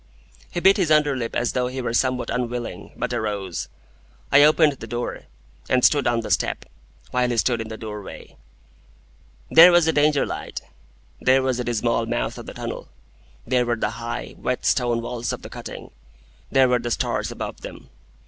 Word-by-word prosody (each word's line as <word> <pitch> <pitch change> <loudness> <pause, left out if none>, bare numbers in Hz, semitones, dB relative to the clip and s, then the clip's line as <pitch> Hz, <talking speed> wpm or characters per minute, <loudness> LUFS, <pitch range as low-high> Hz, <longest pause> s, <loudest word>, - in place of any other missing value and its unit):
He - - -3
bit 195 +3 +5
his 180 -5 +1
under 150 -2 +4
lip 115 -3 -4
as 120 - 0
though 125 -1 0
he 130 +1 -5
were 120 -2 -2
somewhat 130 0 0
unwilling, 120 -1 -4
but 125 +1 -2
arose. 105 -6 -3 0.6
I 145 - +7
opened 155 0 +5
the 135 - -10
door, 120 0 -4 0.4
and 125 -1 +3
stood 145 -4 +3
on 120 -1 +1
the 115 - -6
step, - - 0 0.5
while 125 -1 +1
he 120 - -1
stood 115 +1 +1
in 110 - -6
the 110 0 -7
doorway. 105 -3 -9 1.2
There 170 +3 +9
was 175 -2 +5
the 160 - +2
Danger 145 -1 +3
light. - - -5 0.6
There 130 +1 +3
was 130 -2 0
the 125 - -2
dismal 115 0 0
mouth - - -2
of - - -10
the - - -7
tunnel. - - -6 0.6
There 125 0 +2
were 120 - +1
the 105 -1 -2
high, 115 +1 -6
wet 125 - -2
stone 120 -2 +1
walls 120 0 -3
of - - -6
the - - -9
cutting. - - -9 0.6
There 135 -1 +5
were 125 0 +2
the 120 0 -4
stars - - -1
above - - -6
them. - - -10
125 Hz, 185 wpm, -23 LUFS, 115-135 Hz, 1.2 s, There